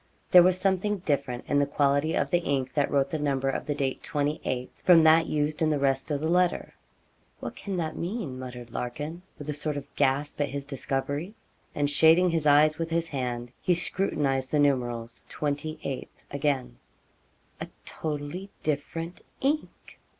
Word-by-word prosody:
There 180 - +10
was 185 +1 +4
something 195 +2 +1
different 140 -4 -1
in 145 - +2
the 140 - +2
quality 140 +2 +2
of - - 0
the 175 - +4
ink 140 -6 -1
that 145 -2 +1
wrote 140 -1 +1
the 155 - -1
number 135 -2 0
of - - -4
the 145 - 0
date, 135 -2 -2
28th, 145 -4 -2
from 170 -3 +7
that 160 +1 +6
used 150 +1 -1
in 160 - +3
the 150 - +2
rest 135 0 0
of 145 -2 0
the 155 - -1
letter. 180 +1 +1 0.7
'What - - -6
can 195 -2 -4
that 160 -2 -2
mean?' 170 - -4
muttered 125 -2 -8
Larkin, 145 +9 -4 0.2
with 145 - -9
a 150 - -1
sort 150 0 -2
of 140 - -9
gasp 145 +2 +1
at 145 - +1
his 140 +1 -5
discovery; 140 - -3 0.4
and 145 -1 +1
shading 160 +5 +5
his 160 -2 +1
eyes 150 +2 +5
with 165 0 -2
his 165 0 0
hand, 125 -4 -3
he 180 -2 +2
scrutinised 145 -7 0
the 150 - +1
numerals 120 -5 0
'28th,' 145 -1 -3 0.2
again; 140 - -1 0.8
'a - - -5 0.2
totally 155 +5 -4
different 165 +3 -3 0.2
ink! 295 +3 -2
145 Hz, 170 wpm, -27 LUFS, 135-165 Hz, 0.8 s, There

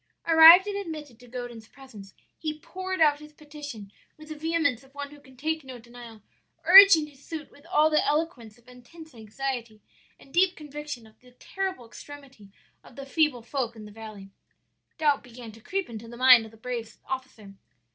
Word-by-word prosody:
"Arrived 330 +3 +9
and 410 -1 -4
admitted 305 - -7
to 245 - -16
Godin's 240 -2 -8
presence, 220 -8 -14 0.2
he 310 -1 -4
poured 375 +3 -6
out 295 -2 +4
his 300 0 -14
petition 290 -9 -10 0.3
with 310 0 -14
the 310 - -6
vehemence 300 -5 -1
of 270 +1 -23
one 285 0 -7
who 295 - -14
can 265 -2 -20
take 315 +3 -3
no 260 -2 -10
denial, 235 -2 -14 0.4
urging 380 -4 +9
his 285 -2 -18
suit 315 -3 -8
with 285 +3 -20
all 315 -3 +3
the 305 - +3
eloquence 290 -8 -2
of 240 0 -27
intense 275 +6 -15
anxiety 230 0 -6 0.4
and 270 - -19
deep 370 +1 +3
conviction 295 -5 -8
of 220 - -21
the 250 0 -21
terrible 375 0 -5
extremity 270 -4 -13 0.3
of - - -17
the 275 - -8
feeble 290 -4 0
folk 240 -2 -4
in 215 -1 -11
the 210 - -12
valley. 210 -3 -11 0.7
"Doubt 295 -3 +2
began 240 -1 -12
to 225 +1 -17
creep 385 - -3
into 230 -1 -9
the 235 +1 -11
mind 255 -2 +7
of - - -11
the 225 - -18
brave 235 -1 -6
officer. 255 -6 -7
270 Hz, 185 wpm, -26 LUFS, 235-310 Hz, 0.7 s, Arrived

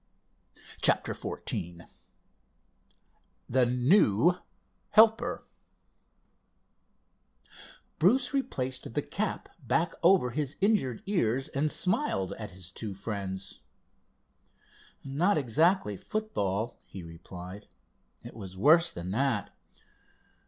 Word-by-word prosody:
CHAPTER - - +3
XIV 85 -1 -4 1.6
THE 125 0 +3
NEW 125 - +4 0.5
HELPER 220 +1 +4 2.5
Bruce 245 - +3
replaced 130 - -3
the - - 0
cap - - -3
back 165 0 0
over 175 -8 +4
his 145 0 -3
injured 195 - +1
ears 135 - 0
and 150 +2 -1
smiled 185 - -1
at 105 - -6
his 90 -1 -12
two 100 +1 -6
friends. 100 -2 -5 1.4
"No, 135 0 -7
not 205 - +3
exactly 150 - +2
football," 115 - -3
he 95 - -9
replied. 90 +4 -10 0.6
"It - - -10
was 95 -4 -9
worse 165 - +5
than 85 +2 -6
that." 120 -2 -1
125 Hz, 90 wpm, -29 LUFS, -, 2.5 s, worse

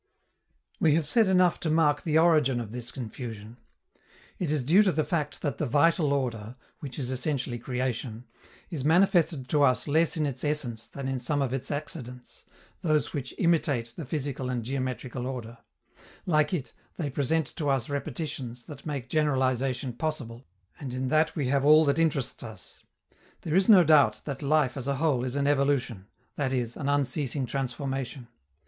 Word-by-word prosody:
We 155 -2 +4
have 160 -2 0
said 220 +6 +4
enough 180 -2 +3
to 160 - -2
mark 150 -2 +3
the 155 -1 +1
origin 155 -6 +4
of 115 -3 -6
this 120 0 -6
confusion. 115 -2 -7 0.8
It 175 - -1
is 150 -3 0
due 170 +11 +5
to 200 -3 +3
the 155 0 0
fact 150 -4 -3
that 145 -4 -2
the 150 - 0
"vital" 150 +3 +3
order, 120 -5 -2 0.2
which 135 -4 -8
is 130 -2 -3
essentially 130 -2 -2
creation, 125 -2 -3 0.5
is 150 -6 -3
manifested 165 -4 +3
to 150 - +2
us 130 0 +3
less 160 +3 +2
in 155 - +1
its 135 -3 -4
essence 125 -7 -2
than 140 -1 -6
in 135 -1 -2
some 145 +4 -1
of 135 -2 0
its 135 0 -3
accidents, 130 -4 -6 0.4
those 155 -4 +1
which 135 -4 -5
imitate 145 -9 +1
the 165 - -6
physical 135 -3 -3
and 125 -2 -2
geometrical 130 0 -3
order; 120 -3 -6 0.7
like 155 -4 +2
it, 165 -9 -3 0.2
they 150 -5 -3
present 145 +2 -1
to 150 -3 -1
us 135 -4 +1
repetitions 140 -4 -4
that 150 +4 -10
make 140 -4 -4
generalization 130 -3 0
possible, 125 -4 -4 0.3
and 130 -3 -5
in 130 0 -2
that 155 +2 +2
we 145 - -1
have 140 0 +2
all 155 +2 +7
that 140 +2 +2
interests 145 -6 0
us. 110 -4 -10 0.6
There 155 - -3
is 190 +5 +3
no 195 -5 +9
doubt 145 -9 +4
that 140 -1 -5
life 145 -3 +2
as 135 0 -5
a 140 - +1
whole 140 -4 +1
is 130 +1 -3
an 140 0 0
evolution, 135 -8 +1 0.3
that 135 -3 0
is, 120 -2 -2
an 140 -2 -3
unceasing 140 -1 0
transformation. 135 0 -4
140 Hz, 175 wpm, -28 LUFS, 125-155 Hz, 0.8 s, no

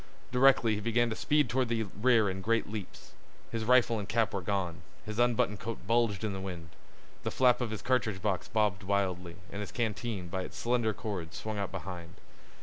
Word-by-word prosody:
Directly 125 -3 +5
he 105 - -2
began 115 +2 +2
to - - -2
speed 150 +2 +2
toward 125 +2 +1
the 115 -1 +1
rear 110 +2 +3
in 95 0 -3
great 115 +3 +1
leaps. 105 -2 -7 0.4
His 115 -1 -2
rifle 120 -2 +4
and 100 0 -6
cap 115 -1 +1
were 100 - -1
gone. 90 -2 -2 0.2
His 110 +1 -4
unbuttoned 120 -4 +2
coat 115 +2 -6
bulged 115 -3 +2
in 105 -2 -1
the 95 - -4
wind. 90 -4 -6 0.5
The - - -2
flap 125 -1 +4
of 120 - -1
his 110 -1 -5
cartridge 120 -6 +1
box 95 -2 -1
bobbed 105 -3 +1
wildly, 95 -3 -1 0.2
and 100 - -5
his 105 - -5
canteen, 110 -4 -2
by 95 +2 -3
its - - -7
slender 120 -3 +1
cord, 90 -6 -5
swung 110 -1 -4
out 100 - -2
behind. 90 -2 -7
110 Hz, 200 wpm, -31 LUFS, 95-115 Hz, 0.5 s, Directly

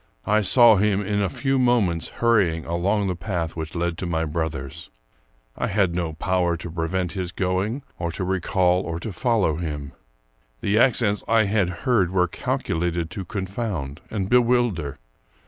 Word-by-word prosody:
I 105 +1 +3
saw 115 +2 +6
him 105 0 +2
in 105 +1 0
a 95 - +1
few 135 +5 0
moments 110 -10 +2
hurrying 100 -9 +1
along 95 +5 0
the 90 - -1
path 85 -2 -3
which 80 0 -6
led 85 0 -1
to 90 - -3
my 80 -1 0
brother's. 75 -4 -4 0.7
I - - -2
had 95 -3 +1
no 85 -2 -2
power 90 +1 0
to 85 0 -7
prevent 85 +2 -2
his 90 -2 -4
going, 95 +9 -1 0.2
or 85 -1 -2
to 95 - -3
recall 90 0 +1
or 85 -3 -4
to 105 +3 -5
follow 110 - +1
him. 75 -4 -4 0.7
The 105 +2 +2
accents 115 -5 +3
I 115 -1 +4
had 100 -3 +1 0.2
heard 110 -9 +3
were 90 -1 +2
cal - - -2
culated 85 0 -2
to 95 +1 -6
confound 95 - -4
and 100 -4 -2
bewilder. 120 - +2
95 Hz, 165 wpm, -23 LUFS, 85-105 Hz, 0.7 s, saw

